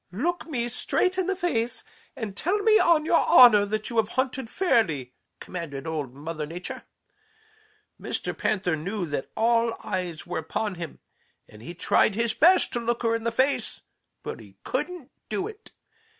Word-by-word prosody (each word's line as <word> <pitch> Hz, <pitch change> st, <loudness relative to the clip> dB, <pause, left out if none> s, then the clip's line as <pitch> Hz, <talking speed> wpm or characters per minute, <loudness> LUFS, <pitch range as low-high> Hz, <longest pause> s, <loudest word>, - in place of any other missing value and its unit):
"'Look 330 Hz, -, -2 dB
me 245 Hz, -7 st, -2 dB
straight 365 Hz, +9 st, 0 dB
in 370 Hz, -, 0 dB
the 385 Hz, -, 0 dB
face 250 Hz, -11 st, -1 dB, 0.3 s
and 220 Hz, -7 st, -5 dB
tell 360 Hz, -, 0 dB
me 435 Hz, 0 st, +6 dB
on 325 Hz, -3 st, +4 dB
your 330 Hz, -, +4 dB
honor 215 Hz, -5 st, +8 dB
that 215 Hz, +2 st, -3 dB
you 235 Hz, -, -4 dB
have 220 Hz, -1 st, +2 dB
hunted 260 Hz, -2 st, -1 dB
fairly,' 170 Hz, -, +1 dB, 0.3 s
commanded 150 Hz, -7 st, -6 dB
Old 150 Hz, -6 st, -4 dB
Mother 155 Hz, +1 st, -5 dB
Nature. 175 Hz, +3 st, -7 dB, 1.2 s
Mr. -, -, -3 dB
Panther 185 Hz, -5 st, 0 dB
knew 180 Hz, +5 st, -3 dB
that 145 Hz, -4 st, -4 dB
all 230 Hz, 0 st, +2 dB
eyes 180 Hz, -4 st, -4 dB
were -, -, -3 dB
upon 205 Hz, +6 st, -3 dB
him, 170 Hz, -3 st, -8 dB, 0.5 s
and 105 Hz, -, -15 dB
he 170 Hz, +9 st, -8 dB
tried 195 Hz, +3 st, +2 dB
his 230 Hz, 0 st, +1 dB
best 355 Hz, +8 st, +4 dB
to 240 Hz, -, 0 dB
look 235 Hz, +1 st, -2 dB
her 230 Hz, 0 st, +2 dB
in 230 Hz, 0 st, -2 dB
the 230 Hz, -, +1 dB
face, 260 Hz, +4 st, 0 dB, 0.4 s
but -, -, -6 dB
he -, -, -15 dB
couldn't 350 Hz, -7 st, -4 dB, 0.2 s
do 385 Hz, 0 st, -2 dB
it. 435 Hz, 0 st, -12 dB
225 Hz, 170 wpm, -26 LUFS, 175-280 Hz, 1.2 s, honor